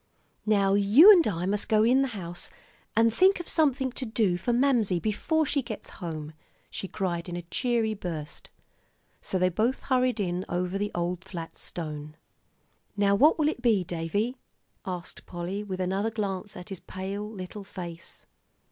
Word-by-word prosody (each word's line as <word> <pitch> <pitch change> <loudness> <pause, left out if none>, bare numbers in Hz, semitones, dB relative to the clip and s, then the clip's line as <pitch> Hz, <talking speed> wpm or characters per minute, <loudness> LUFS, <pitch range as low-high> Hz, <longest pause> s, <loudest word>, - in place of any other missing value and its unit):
"Now 200 -2 +3
you 210 - +8
and 355 -5 +6
I 175 -4 -1
must 205 +2 -1
go 215 -1 +4
in 250 +4 +4
the 270 - +2
house 175 -1 -5 0.5
and 225 0 +4
think 375 +9 +4
of 345 - -6
something 275 -5 +2
to 260 - -6
do 220 -6 +1
for 185 +7 -1
Mamsie 235 -7 +2
before 315 - 0
she 280 0 0
gets 235 -4 -8
home," 155 -3 -5 0.4
she 195 - -4
cried 175 -2 -3
in 175 - -4
a 175 - -5
cheery 230 +4 0
burst. 165 -7 -6 0.7
So 190 - -2
they 185 0 +3
both 225 +8 0
hurried 255 -3 +1
in 180 -2 -1
over 180 +2 -1
the 205 0 -1
old 175 +1 -2
flat 170 -4 -7
stone. 150 -2 -6 0.8
"Now 200 -1 +3
what 290 +10 +5
will 305 -2 +2
it 310 - -2
be, 220 -6 +3
Davie?" 185 +8 -2 0.5
asked 180 -1 -6
Polly, 180 +4 -4
with 190 -3 -5
another 190 +4 0
glance 205 -2 -4
at 180 +3 -9
his 195 -3 -6
pale 195 +2 -5
little 200 0 -7
face. 175 -4 -9
200 Hz, 170 wpm, -27 LUFS, 180-235 Hz, 0.8 s, you